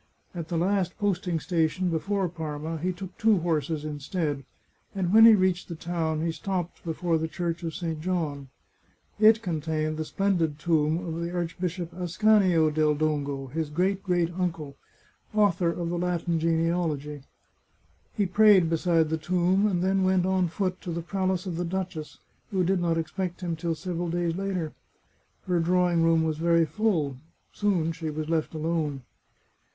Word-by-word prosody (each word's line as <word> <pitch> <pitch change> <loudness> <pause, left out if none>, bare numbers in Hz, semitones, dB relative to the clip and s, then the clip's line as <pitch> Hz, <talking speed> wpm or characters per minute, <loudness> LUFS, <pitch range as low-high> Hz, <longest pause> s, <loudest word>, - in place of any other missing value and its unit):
At 170 -3 -5
the 170 - -2
last 185 +1 0
posting 185 -5 0
station 175 +2 0
before 195 +4 0
Parma 160 -1 -5
he 180 +4 -1
took 185 +1 -8
two 220 -1 +4
horses 155 -2 -1
instead, 150 -1 -3 0.5
and 185 -1 -1
when 225 +1 +9
he 225 - +9
reached 185 -2 +1
the 170 - -6
town 160 -2 -2
he 165 - 0
stopped 180 0 -4
before 165 0 0
the 160 - -1
Church 170 +1 -3
of 165 -2 -4
St. 165 -3 -4
John. 155 -6 -2 0.7
It 220 +1 +6
con 165 -5 -2
tained 155 0 -2
the 155 - -1
splendid 175 -6 0
tomb 160 +2 +1
of 165 0 -4
the 170 - -2
Archbishop 175 0 -3
Ascanio 180 -2 +3
del 155 -1 +2
Dongo, 145 -2 -1
his 160 -1 -2
great 185 +5 0
great 175 -3 0
uncle, 165 -6 -3 0.6
author 190 -5 +3
of 170 0 -3
the 175 0 -2
Latin 175 -1 0
Gene 165 0 +1
alogy. 150 -4 -2 0.9
He 205 - +1
prayed 190 -3 +5
beside 165 -1 +2
the 160 - 0
tomb, 180 +4 +2
and 180 -4 0
then 190 0 +2
went 185 -1 +2
on 185 -1 +2
foot 185 +1 -2
to 175 - -5
the 170 0 -3
palace 185 0 -1
of 175 -3 -4
the 175 - -1
duchess, 175 -3 -4 0.3
who 190 -2 +1
did 185 +1 +1
not 165 -1 +1
expect 180 +3 -3
him 170 -2 -2
till 165 0 -2
several 175 +1 -3
days 170 -1 -1
later. 185 -5 -3 0.7
Her 180 -2 +1
drawing 175 0 +2
room 165 0 +4
was 155 -1 -1
very 170 0 +3
full. 160 - 0 0.4
Soon 185 -6 +1
she 165 -1 -5
was 155 +1 -4
left 160 -1 -1
alone. 155 -4 -2
170 Hz, 170 wpm, -27 LUFS, 160-185 Hz, 0.9 s, when